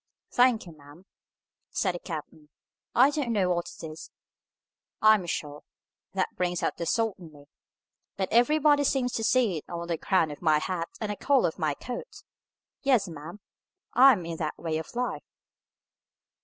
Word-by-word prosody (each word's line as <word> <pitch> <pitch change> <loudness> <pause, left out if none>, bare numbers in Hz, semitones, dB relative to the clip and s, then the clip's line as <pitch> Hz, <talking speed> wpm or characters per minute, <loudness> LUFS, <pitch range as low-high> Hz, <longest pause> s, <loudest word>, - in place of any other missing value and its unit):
"Thank'ee, 245 -8 +3
ma'am," 150 +3 -16 0.6
said 185 -3 0
the 175 - -5
captain, 155 -3 -8 0.5
"I 265 +4 +6
don't 285 -5 -2
know 190 -5 +2
what 175 -1 -1
it - - -12
is, 155 0 -9 0.9
I 215 0 +7
am 190 -5 0
sure; 150 -3 -4 0.5
that 190 -1 -1
brings 180 -1 -1
out - - -1
the 170 - -3
salt 225 -4 0
in 165 -3 -12
me, 145 -1 -16 0.7
but 190 -1 0
everybody 290 +5 +4
seems 260 -3 +1
to 225 - -2
see 225 -7 +2
it 150 - -8
on 170 0 -5
the 165 -2 -1
crown 175 -6 +2
of 145 - -9
my 155 -3 +4
hat 170 +1 -3
and 215 -2 -2
the - - -3
collar 270 0 +2
of 160 - -13
my 155 -3 0
coat. 250 - -8 0.6
Yes, 250 -8 +3
ma'am, 165 +4 -9 0.5
I 265 +2 +8
am 180 -7 -4
in 165 -1 -5
that 155 -2 -3
way 160 -1 -2
of 160 - -9
life." 250 0 -2
185 Hz, 175 wpm, -27 LUFS, 160-240 Hz, 0.9 s, I